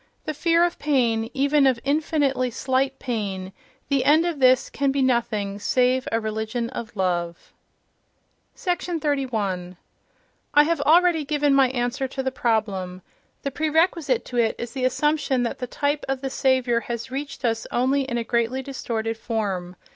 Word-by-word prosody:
—The 310 - -2
fear 335 +3 +3
of 350 - -3
pain, 235 -6 +1
even 280 +2 +3
of 255 -3 +2
infinitely 280 -3 +1
slight 265 +2 -1
pain—the 220 +4 -4
end 310 +3 +4
of 340 -4 -2
this 255 -1 +4
can 280 -1 0
be 275 - -1
nothing 215 -5 0
save 255 +3 +1
a 225 - +2
religion 220 +2 -3
of 235 -3 -7
love.... 175 -3 -2 1.0
31. 265 - -2 0.8
I 295 - +8
have 325 -1 0
already 330 +1 +4
given 290 -1 +1
my 270 -2 +5
answer 255 +1 -1
to 265 +1 -4
the 265 - -1
problem. 195 -7 -1 0.4
The 275 - -2
prerequisite 315 -2 +1
to 245 - -5
it 225 -2 +2
is 235 - -5
the 260 -2 -2
assumption 280 -1 +1
that 235 - -3
the 250 - -4
type 285 +4 -1
of 270 -1 -1
the 270 -1 -3
Saviour 260 -3 +2
has 235 +1 -6
reached 280 0 -5
us 225 -1 -1
only 265 +3 +2
in 260 -3 -3
a 235 - -1
greatly 235 +3 0
distorted 225 -4 -3
form. 195 -6 -3
255 Hz, 155 wpm, -24 LUFS, 225-280 Hz, 1.0 s, I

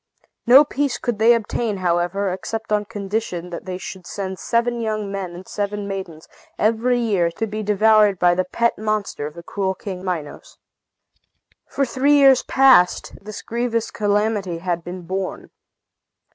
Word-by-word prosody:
No 265 +5 +8
peace 285 -2 -1
could 240 -4 -3
they 235 +2 +6
obtain, 220 -1 -2
however, 180 +2 0
except 220 +4 -5
on 210 0 +1
condition 200 -4 -4
that 170 - -7
they 185 -1 -4
should 185 -1 -9
send 190 -2 -5
seven 235 +1 0
young 215 -2 -2
men 190 -3 -5
and 185 +2 -11
seven 205 0 -3
maidens, 190 -5 -6 0.3
every 230 +3 +2
year, 200 -8 +1
to 225 - -2
be 215 0 -5
devoured 210 -1 +4
by 175 0 +4
the 185 +1 +1
pet 235 +4 0
monster 215 -8 -2
of 150 - -11
the 170 - -10
cruel 190 +1 -2
King 185 -1 -7
Minos. 165 -6 -5 1.1
For 275 - 0
three 265 +4 +2
years 270 -3 +6
past, 260 -10 +4
this 215 0 -8
grievous 230 -1 -2
calamity 205 -3 0
had 175 -1 -3
been 180 +1 -7
borne. 190 +2 -5
205 Hz, 160 wpm, -21 LUFS, 185-225 Hz, 1.1 s, No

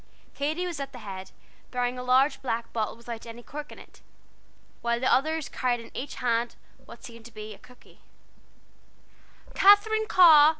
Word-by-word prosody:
Katy 310 +5 -1
was 345 -4 -4
at 275 0 -5
the - - -8
head, 190 -1 -7 0.4
bearing 250 0 -1
a - - -3
large 260 +3 +3
black 235 -3 -3
bottle 220 -2 -1
without 235 -1 -8
any 235 +1 -9
cork 300 +3 -8
in - - -11
it, - - -16 0.8
while 235 0 0
the 260 - -2
others 315 +2 +1
carried 245 -1 -1
in 230 - -12
each 275 - -5
hand 235 -1 0 0.3
what - - -13
seemed 230 -2 -11
to 235 - -11
be 215 -1 -8
a - - -15
cookie. 250 0 -19 1.5
"Katherine 430 +2 +5
Carr! 315 -6 +8
250 Hz, 170 wpm, -27 LUFS, 235-300 Hz, 1.5 s, Carr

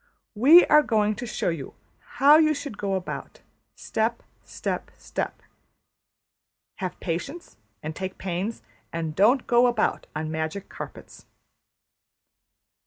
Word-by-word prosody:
We 285 +11 +8
are 300 - +6
going 215 -6 +1
to 245 - -5
show 225 - -1
you 160 -6 -5 0.4
how 290 +4 +7
\emph{you} 310 -1 +4
should 285 -4 -6
go 195 -1 -1
about: 185 -1 -6 0.3
step, 225 +2 -2 0.2
step, - - -4
step. - - -5 1.3
Have 185 -2 -5
patience, 235 - -5 0.3
and 155 +1 -5
take 190 0 -5
pains; 190 +4 -4 0.3
and 160 -2 -4
don't 240 +8 +4
go 240 +1 +4
about 240 -3 0
on 155 0 -3
magic 160 +5 -4
carpets.'' - - -10
210 Hz, 120 wpm, -25 LUFS, 175-250 Hz, 1.3 s, We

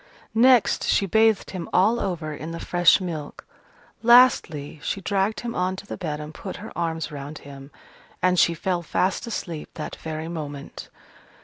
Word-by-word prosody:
Next, 245 0 +4
she 200 - +3
bathed 220 +1 +2
him 180 -3 -6
all 215 +6 +3
over 165 -7 -3
in 155 +2 -7
the 165 0 -6
fresh 175 +1 +4
milk. 160 -6 -6 0.6
Lastly, 230 - +4
she 195 - -2
dragged 195 +2 -1
him 235 -1 -4
on 185 +1 -1
to 195 - -10
the - - -6
bed 155 -5 -4
and 150 +1 -8
put 190 - -7
her 215 +4 -10
arms 165 -2 -2
round 145 +1 -7
him. 140 -1 -11 0.5
And 180 -1 +2
she 170 - +4
fell 175 +1 -1
fast 185 +6 -1
asleep 170 -8 -5
that 155 - -6
very 160 0 -5
moment. 145 -4 -7
175 Hz, 170 wpm, -24 LUFS, 155-200 Hz, 0.6 s, Next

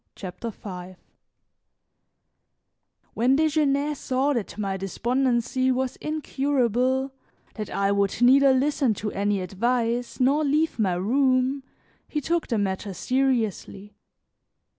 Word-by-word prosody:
CHAPTER 185 +4 -6
V 185 -3 -9 2.2
WHEN 250 +4 +3
Desgenais 300 -2 +1
saw 265 +2 0
that 230 -6 -4
my 195 -2 -2
despondency 245 +6 0
was 260 0 -1
incurable, 265 -3 0 0.4
that 215 -3 -6
I 200 0 0
would 200 0 0
neither 270 +3 +6
listen 265 -3 +1
to 210 +1 -4
any 200 0 0
advice 235 +5 -1
nor 275 +4 +3
leave 305 0 +1
my 190 -5 +1
room, 255 +6 +1 0.5
he 300 - -2
took 335 +3 -1
the 230 - 0
matter 195 -1 -2
seriously. 230 -6 -1
250 Hz, 110 wpm, -25 LUFS, 205-275 Hz, 2.2 s, neither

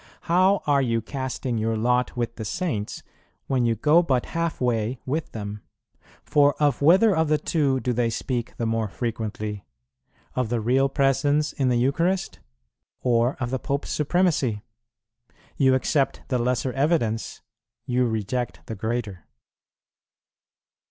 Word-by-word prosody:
How 185 +3 +3
are 145 -2 +3
you 115 -3 +1
casting 130 -1 -3
your 110 0 0
lot 125 +3 +1
with 115 -1 -2
the 110 - -4
Saints, 110 - -3 0.4
when 130 -3 +1
you 115 -1 +2
go 155 +7 +4
but 130 -8 0
half 165 -1 -1
way 120 -1 0
with 155 +5 -2
them? 105 -1 -6 0.6
For 145 -1 +3
of 145 -4 +2
whether 185 +7 +5
of 160 0 +2
the 155 0 +3
two 145 -3 +1
do 125 -1 -1
they 120 0 +1
speak 120 +1 -3
the 115 - -2
more 115 -1 0
frequently, 105 -2 -4 0.7
of 125 -3 0
the 120 0 0
Real 130 +5 +2
Presence 145 +2 +1
in 135 -3 0
the 125 - +2
Eucharist, 170 +10 0 0.6
or 120 +1 +2
of 125 -2 -2
the 130 - -1
Pope's 140 +3 -3
supremacy? 150 - +1 0.9
You 130 -1 +4
accept 135 +2 0
the 125 -2 +1
lesser 125 +1 0
evidence, 135 -6 0 0.4
you 125 0 +1
reject 115 +3 -3
the - - -6
greater." 110 -4 -4
125 Hz, 145 wpm, -24 LUFS, 115-145 Hz, 0.9 s, whether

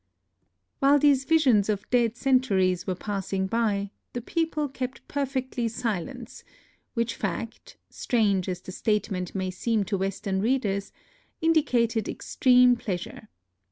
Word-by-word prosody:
While 280 +1 +5
these 280 -2 +3
visions 260 -10 +4
of 205 -1 -2
dead 240 -2 +2
centuries 200 -10 +2
were 185 - 0
passing 195 0 -3
by, 200 -2 0 0.2
the 245 - -3
people 315 +2 -1
kept 260 -1 -6
perfectly 260 -4 -2
silent, 230 +2 -4 0.3
— - - -39
which 230 -1 0
fact, 220 +3 -5
strange 200 -6 +1
as 180 -1 -4
the 185 - -9
statement 195 -3 -1
may 190 -1 -2
seem 215 +3 0
to 195 0 -2
Western 195 0 -2
readers, 205 -4 0 0.5
indicated 245 -9 +2
extreme 250 -1 +4
pleas 185 -6 -3
ure. 215 - -12
225 Hz, 130 wpm, -26 LUFS, 195-255 Hz, 0.5 s, While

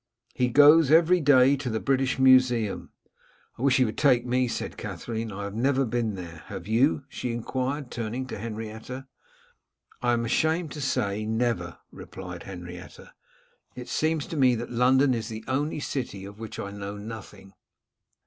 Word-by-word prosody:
'He 125 - +1
goes 145 +4 +6
every 165 +3 +5
day 135 -1 +5
to 135 -2 -4
the 110 -1 -1
British 135 +1 0
Museum.' 130 -5 +3 0.7
'I - - -7
wish 135 -1 +4
he 130 - +4
would 110 - -4
take 125 -4 +4
me,' 125 +1 +1
said - - -4
Katherine. 115 -1 -5
'I 100 +1 -6
have 100 0 -5
never 135 +4 +1
been 115 -3 -1
there. 85 -3 -9
Have - - -7
you?' 130 +6 +2
she 125 -2 -4
enquired, 130 +4 -3
turning 120 +2 -4
to 125 - -7
Henrietta. 110 +4 -6 1.0
'I 120 0 +2
am 115 0 0
ashamed 160 +6 +1
to 150 - -6
say 105 -6 -1
never,' 115 +2 -1
replied 90 -2 -9
Henrietta. 90 -1 -10 0.6
'It 125 0 -8
seems 155 +2 0
to 165 - -6
me 130 -3 +4
that 120 +2 -5
London 130 +3 +4
is 115 -2 -3
the 110 0 -7
only 145 +4 -1
city 120 -9 -4
of 100 +2 -11
which 110 -1 -7
I 100 - -5
know 100 0 -6
nothing. 100 -2 -10
120 Hz, 170 wpm, -26 LUFS, 110-135 Hz, 1.0 s, goes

